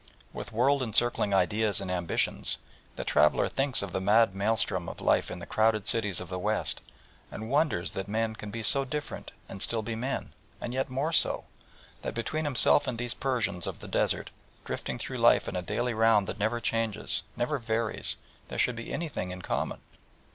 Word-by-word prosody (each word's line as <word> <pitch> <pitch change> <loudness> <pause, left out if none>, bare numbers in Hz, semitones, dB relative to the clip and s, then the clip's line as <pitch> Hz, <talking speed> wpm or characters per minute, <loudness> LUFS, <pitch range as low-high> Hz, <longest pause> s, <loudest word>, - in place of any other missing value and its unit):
With - - -6
world 135 +5 +3
encircling 120 -2 +2
ideas 105 +2 +2
and 95 -2 -4
ambitions, 90 -2 0 0.4
the - - -4
traveller 75 +1 +3
thinks 135 -5 +1
of 100 - -5
the 95 - -2
mad 105 +2 +4
maelstrom 100 -3 0
of - - -8
life - - +2
in 90 - -5
the 85 - -7
crowded 110 -2 +2
cities 105 -4 +3
of 90 - -6
the 90 +1 -4
West, 105 +3 -1 0.5
and 110 +3 -6
wonders 145 - +2
that 95 - -4
men 110 +1 0
can 105 -1 -8
be 115 +2 -5
so 135 +4 +5
different 145 +2 -5 0.2
and 95 - -8
still 115 -2 +2
be 115 +1 -3
men, 125 +5 -3 0.3
and 120 - -4
yet 130 +1 -1
more 140 +6 -1
so, - - +2 0.6
that - - -4
between 155 +7 -2
himself 145 +1 +3
and 125 - -2
these 120 0 -2
Persians 115 -9 -1
of - - -4
the - - -10
desert, - - 0 0.3
drifting - - -4
through - - -5
life - - +5
in - - -4
a 90 - 0
daily 115 +7 -1
round 110 -2 +4
that - - -6
never 110 +3 +1
changes, 115 -2 0 0.2
never 135 +4 0
varies, 115 -1 0 0.3
there - - -6
should 125 - +2
be 115 0 -7
anything 155 - -3
in 90 0 -7
common. - - -2
110 Hz, 190 wpm, -29 LUFS, 100-125 Hz, 0.6 s, so